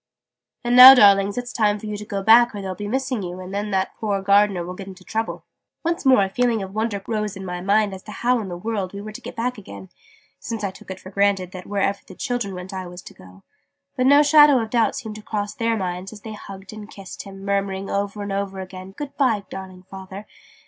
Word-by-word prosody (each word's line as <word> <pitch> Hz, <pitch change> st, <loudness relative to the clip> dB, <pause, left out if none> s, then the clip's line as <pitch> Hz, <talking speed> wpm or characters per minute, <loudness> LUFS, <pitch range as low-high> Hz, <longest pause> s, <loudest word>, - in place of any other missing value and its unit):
"And 240 Hz, 0 st, +1 dB
now 255 Hz, +2 st, +12 dB
darlings 200 Hz, -3 st, +5 dB
it's 245 Hz, 0 st, -4 dB
time 210 Hz, -2 st, +2 dB
for 210 Hz, -, -10 dB
you 210 Hz, 0 st, -4 dB
to 210 Hz, 0 st, -7 dB
go 200 Hz, -1 st, -4 dB
back 230 Hz, +2 st, +6 dB
or 205 Hz, -, -5 dB
they'll 190 Hz, -1 st, -4 dB
be 205 Hz, +2 st, -6 dB
missing 260 Hz, 0 st, -2 dB
you 180 Hz, 0 st, -6 dB
and 185 Hz, +1 st, -8 dB
then 205 Hz, +1 st, -2 dB
that 190 Hz, -1 st, -1 dB
poor 205 Hz, -3 st, -1 dB
Gardener 200 Hz, -2 st, +3 dB
will 180 Hz, -, -6 dB
get 190 Hz, +1 st, -9 dB
into 190 Hz, -1 st, -11 dB
trouble!" 225 Hz, +4 st, -4 dB, 0.4 s
Once 335 Hz, -3 st, -1 dB
more 255 Hz, -6 st, +6 dB
a 195 Hz, -, -2 dB
feeling 235 Hz, -2 st, +1 dB
of 190 Hz, 0 st, -8 dB
wonder 215 Hz, -2 st, -2 dB
rose 210 Hz, -2 st, -3 dB
in 190 Hz, -, -7 dB
my 180 Hz, -1 st, -5 dB
mind 205 Hz, +1 st, +2 dB
as 190 Hz, -, -8 dB
to 210 Hz, -, -9 dB
how 245 Hz, +3 st, +1 dB
in 210 Hz, -, -5 dB
the 175 Hz, -, -5 dB
world 200 Hz, -1 st, -3 dB
we 200 Hz, -, -6 dB
were 215 Hz, +1 st, -8 dB
to 215 Hz, -, -10 dB
get -, -, -9 dB
back 245 Hz, 0 st, -2 dB
again 100 Hz, -, -11 dB, 0.5 s
since 225 Hz, -2 st, -5 dB
I 195 Hz, -, -1 dB
took 190 Hz, -, -16 dB
it 190 Hz, 0 st, -6 dB
for 185 Hz, -, -12 dB
granted 200 Hz, -2 st, +1 dB
that 185 Hz, -2 st, -9 dB
wherever 200 Hz, 0 st, 0 dB
the -, -, -12 dB
children 240 Hz, -6 st, -3 dB
went 180 Hz, +1 st, -8 dB
I 185 Hz, -1 st, -5 dB
was 180 Hz, +1 st, -10 dB
to -, -, -12 dB
go 95 Hz, +1 st, -17 dB, 0.5 s
but 255 Hz, -1 st, +1 dB
no 285 Hz, +2 st, +7 dB
shadow 295 Hz, -1 st, +7 dB
of 225 Hz, -1 st, -4 dB
doubt 235 Hz, -2 st, +2 dB
seemed 220 Hz, -3 st, -6 dB
to -, -, -10 dB
cross 210 Hz, -1 st, -4 dB
their 230 Hz, -1 st, 0 dB
minds 185 Hz, 0 st, -4 dB
as 215 Hz, -2 st, -12 dB
they 220 Hz, 0 st, -8 dB
hugged 195 Hz, -1 st, -10 dB
and 215 Hz, -1 st, -10 dB
kissed 195 Hz, -2 st, -9 dB
him 195 Hz, -1 st, -11 dB
murmuring 195 Hz, -1 st, -1 dB
over 200 Hz, +1 st, -2 dB
and 200 Hz, -, -5 dB
over 195 Hz, -1 st, -3 dB
again 185 Hz, 0 st, -9 dB
"Good 290 Hz, -1 st, -6 dB
bye 230 Hz, -8 st, +2 dB
darling 185 Hz, -1 st, -9 dB
Father!" 190 Hz, +2 st, -10 dB
200 Hz, 250 wpm, -22 LUFS, 190-225 Hz, 0.5 s, now